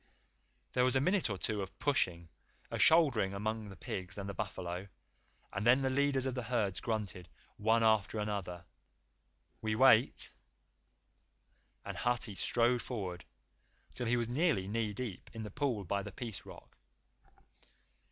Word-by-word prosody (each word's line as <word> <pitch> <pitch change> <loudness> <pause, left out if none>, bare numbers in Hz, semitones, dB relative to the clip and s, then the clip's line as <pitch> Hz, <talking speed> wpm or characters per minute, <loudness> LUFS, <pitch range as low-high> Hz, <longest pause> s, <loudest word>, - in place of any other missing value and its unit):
There 125 - +3
was 130 0 +2
a - - +5
minute 185 - +2
or 100 - -2
two 105 +1 -2
of 95 - -7
pushing 85 - +1 0.4
a - - -3
shouldering 130 - +5
among 110 +1 -3
the 95 - -10
pigs 95 0 -4
and 100 -1 -4
the 100 - -4
buffalo, 95 -2 -4 0.7
and 100 - -2
then 125 +4 +5
the 130 - +1
leaders 140 -1 +2
of 130 - -1
the 125 - -2
herds 115 -5 -1
grunted, 100 -7 -3 0.3
one 110 +2 +3
after 110 -1 +3
another, 100 -5 -3 1.0
"We 110 -1 0
wait," 125 -1 +5 1.5
and - - -5
Hathi 120 -3 0
strode 120 +5 +2
forward, 95 -7 -5 0.7
till 120 - -3
he 120 +1 +3
was 120 -1 0
nearly 135 - +1
knee 110 +1 -1
deep 105 -2 -6
in 110 - -5
the 105 - -7
pool 130 -5 -1
by 100 +3 -1
the - - -7
Peace 115 -5 -7
Rock. - - -13
110 Hz, 150 wpm, -33 LUFS, 100-125 Hz, 1.5 s, a